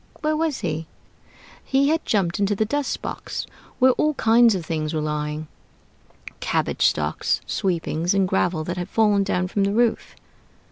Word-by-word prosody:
Where 310 0 +1
was 315 -2 -1
he? 160 -3 -3 0.8
He 275 +1 +2
had 325 +1 0
jumped 190 -5 +1
into 205 0 +1
the 220 - +1
dust 290 +5 -2
box, - - -5 0.3
where 260 0 +5
all 300 +4 +1
kinds 230 -1 +5
of 175 -3 -4
things 155 -1 -2
were - - 0
lying: 150 0 -3 0.9
cabbage - - +1
stalks, - - 0
sweepings, 175 -2 -1
and 195 -1 +3
gravel 180 -3 0
that 175 +3 -4
had 180 +1 -4
fallen 210 -2 +3
down 185 -2 0
from 200 +2 0
the 200 +1 +1
roof. 235 +1 0
195 Hz, 160 wpm, -23 LUFS, 165-235 Hz, 0.9 s, where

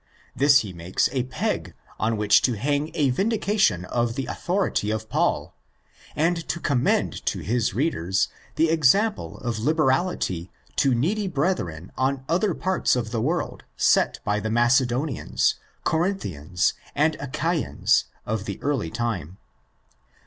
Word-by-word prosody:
This 140 0 +5
he 100 -4 -7
makes 85 +2 0
a 130 -3 -1
peg 130 - -3 0.2
on 110 0 +1
which 105 -1 +5
to 125 -4 +1
hang 145 +6 0
a 145 -5 +2
vindication 200 - +1
of 120 +4 -1
the 135 -1 -2
authority 180 - -1
of 110 0 -2
Paul, - - 0 0.6
and 170 +3 +2
to 170 - -2
commend 135 -7 +1
to - - 0
his 115 -2 0
readers 95 - +1 0.3
the 160 0 +3
example 195 - +2
of 120 -3 -3
liberality 135 - +1 0.3
to 135 -3 +3
needy 195 - 0
brethren 135 - -2
in 130 0 0
other 180 +1 +1
parts 185 -6 +1
of 115 -3 -2
the 115 -1 -1
world 165 +8 -2
set - - +3
by 105 +1 0
the 110 +1 -3
Macedonians, 120 - +2 0.3
Corinthians, 100 - 0 0.2
and 155 +2 +2
Achaians 155 +2 +1 0.2
of 110 -1 -2
the - - -5
early 140 - 0
time. 95 -6 -3
130 Hz, 135 wpm, -24 LUFS, 110-160 Hz, 0.6 s, This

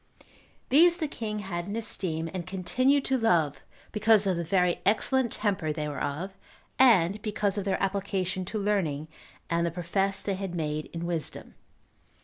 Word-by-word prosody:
These 340 +6 +6
the 315 - -1
king 215 -6 -4
had 175 -2 -4
in 200 - -4
esteem, 175 -7 -3
and 185 -2 -5
continued 255 +10 +1
to 265 -1 +1
love, 170 - +2 0.3
because 215 -1 +4
of 190 -2 +2
the 170 - -2
very 180 +1 +1
excellent 235 +4 +2
temper 195 -7 0
they 150 0 -3
were 145 -1 -5
of, 160 +7 -3 0.5
and 205 -6 +5
because 210 -2 -1
of 205 -2 -3
their 195 - +1
application 190 -1 -1
to 215 - -4
learning, 175 -8 -1 0.4
and 170 0 +1
the 170 - +1
profess 195 +3 -1
they 200 - -2
had 190 -2 -4
made 155 -2 -2
in 170 0 -4
wisdom. 165 -4 -4
190 Hz, 165 wpm, -28 LUFS, 170-210 Hz, 0.5 s, These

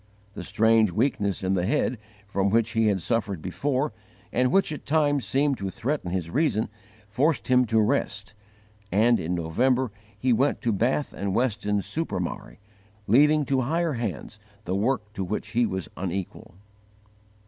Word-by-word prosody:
The - - -7
strange 110 -1 +3
weakness 100 -3 0
in 95 +1 +1
the 90 -1 0
head, 130 -3 0 0.3
from 100 0 0
which 115 +2 +2
he 115 -1 +2
had 95 -4 +1
suffered 110 -6 0
before 130 - -1 0.4
and 125 +1 +2
which 195 -4 +3
at 150 - -6
times 145 -2 +2
seemed 140 0 +1
to 100 -1 -3
threaten 120 0 -3
his 85 -2 -3
reason, 130 -8 +1 0.4
forced 135 +10 0
him 125 0 +5
to 110 -1 +2
rest; 105 -3 0 0.6
and 115 +4 +4
in 85 +3 -2
November 120 +10 +1 0.3
he 125 -1 +2
went 135 +5 +1
to 115 - +1
Bath 125 +8 0
and 100 -1 -3
Weston 105 -5 0
super 160 - -2
Mare, 65 -8 -5 0.5
leaving 150 +7 +4
to 135 0 +1
higher 165 +5 0
Hands 110 - -5 0.3
the 90 - -2
work 105 0 -1
to 95 - -3
which 105 +4 -4
he 115 +1 +2
was 95 -3 -4
unequal. 95 -1 -5
110 Hz, 160 wpm, -26 LUFS, 100-135 Hz, 0.6 s, him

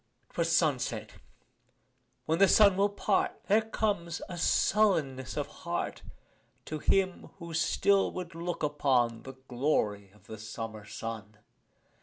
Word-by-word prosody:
'Twas - - 0
sunset: - - +1 1.1
when 160 +2 0
the 195 - +7
sun 200 -1 +6
will 200 +2 +3
part 200 0 0
There 210 +3 +4
comes 205 -6 -2
a 180 - -6
sullenness 160 - +1
of - - 0
heart - - -4 0.6
To 155 - -5
him 185 +3 +1
who 170 -2 -8
still 195 +4 +2
would 180 -1 -6
look 170 0 -4
upon 130 -6 +1
The 135 - -9
glory 110 -7 0
of 100 0 -24
the 110 -1 -9
summer 110 0 -7
sun. 110 -1 -7
155 Hz, 130 wpm, -30 LUFS, -, 1.1 s, the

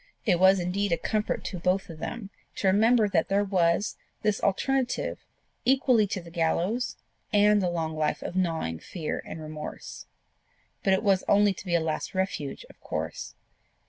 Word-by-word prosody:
It 180 -6 +3
was 190 +1 +6
indeed 185 +3 -1
a 170 - +3
comfort 215 -1 -1
to 185 - -4
both 185 +2 +1
of 165 -2 -10
them 200 +3 -5 0.2
to - - -4
remember 220 +3 +4
that 175 -5 +1
there 200 +1 +3
was 185 -1 +1 0.3
this 210 -1 +1
alternative 255 +6 0 0.4
equally 255 -4 +4
to 195 - -3
the 170 -1 -12
gallows 175 +8 0 0.3
and 210 -1 +5
a 180 - +1
long 160 -2 -2
life 155 -1 -1
of - - -5
gnawing 165 - -1
fear 160 - -4
and - - -7
remorse. 155 -1 -8 0.8
But 195 - +3
it 190 - +1
was 195 -2 +3
only 205 0 +4
to 190 - -11
be 170 - +1
a - - +4
last 160 +3 -3
refuge 185 -7 -2
of - - -18
course. - - -5
190 Hz, 175 wpm, -27 LUFS, 170-205 Hz, 0.8 s, was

